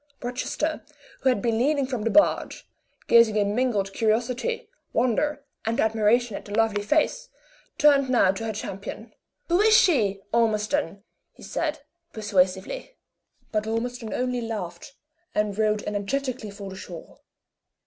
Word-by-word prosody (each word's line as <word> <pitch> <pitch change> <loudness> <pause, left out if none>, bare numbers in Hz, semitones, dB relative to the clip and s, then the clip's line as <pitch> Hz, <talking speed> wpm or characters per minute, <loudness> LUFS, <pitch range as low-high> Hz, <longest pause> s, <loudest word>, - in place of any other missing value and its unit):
Rochester, 255 +5 -2 0.4
who 265 - +2
had 245 -6 0
been 230 -2 +1
leaning 280 +2 +2
from 255 -4 -3
the 230 - 0
barge, 305 +6 +2 0.4
gazing 230 -2 +5
in 205 -1 +1
mingled 210 -5 0
curiosity, 240 - 0 0.3
wonder, 280 +5 0 0.2
and 225 +1 -1
admiration 220 +1 +2
at - - -6
the 205 - -5
lovely 220 -2 +2
face, 310 - 0 0.5
turned 280 -3 +5
now 235 -7 +4
to 210 +4 -5
her 220 - -1
champion. 200 +2 -7 0.3
"Who 350 +3 +3
is 435 0 +6
she, 215 - +3
Ormiston?" 210 -4 +1 0.3
he - - -16
said, 310 -3 -2 0.3
persuasively. 205 - -1 0.5
But 215 0 -1
Ormiston 230 0 -3
only 250 -1 -1
laughed, 210 +1 -6 0.4
and 210 -1 0
rowed 215 0 +1
energetically 225 +3 -3
for 200 -1 -8
the - - -8
shore. 175 -3 -10
225 Hz, 140 wpm, -25 LUFS, 210-255 Hz, 0.5 s, is